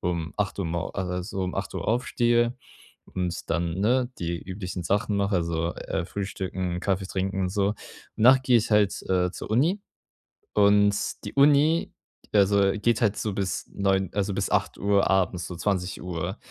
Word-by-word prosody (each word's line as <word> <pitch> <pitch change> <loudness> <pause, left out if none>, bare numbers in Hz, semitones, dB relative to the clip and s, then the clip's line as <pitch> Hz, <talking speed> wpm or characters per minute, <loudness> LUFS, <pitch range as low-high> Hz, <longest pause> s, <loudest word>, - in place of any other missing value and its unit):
um 85 -3 -2
8:00 100 -1 -1
mor 85 +3 -3
a 95 -2 -2
also 90 +1 -3
8:00 - - -4
aufstehe 120 0 +1 0.6
und 90 -2 -3
dann, 85 +1 0
ne, 125 +3 +2
die 85 0 -3
üblichen 95 -1 -5
Sachen 100 +4 0
mache, 100 0 +1
also, 85 0 -1
äh, - - -3
frühstücken, 95 -2 -4
Kaffee 95 -1 -1
trinken 95 0 -2
und 90 - 0
so. 100 +2 0 0.4
Danach 130 +4 +6
gehe 125 -2 +4
ich 110 - -3
halt, 105 -2 +3
äh, 90 -1 +2
zur - - -8
Uni. 160 - +2 0.7
Und 100 0 +4 0.3
die 105 - -6
Uni, 145 +4 +4 0.4
also 100 -1 +4
geht 115 +4 +1
halt 105 -3 +2
so 105 -3 -2
bis 95 -2 -3
21:00 95 -2 +1
also 100 -1 -1
bis 100 0 -1
20:00 100 0 +1
Uhr 100 - +3
abends, 90 -3 +1
so 90 - -7
20:00. 90 0 -3
100 Hz, 160 wpm, -26 LUFS, 90-105 Hz, 0.7 s, Danach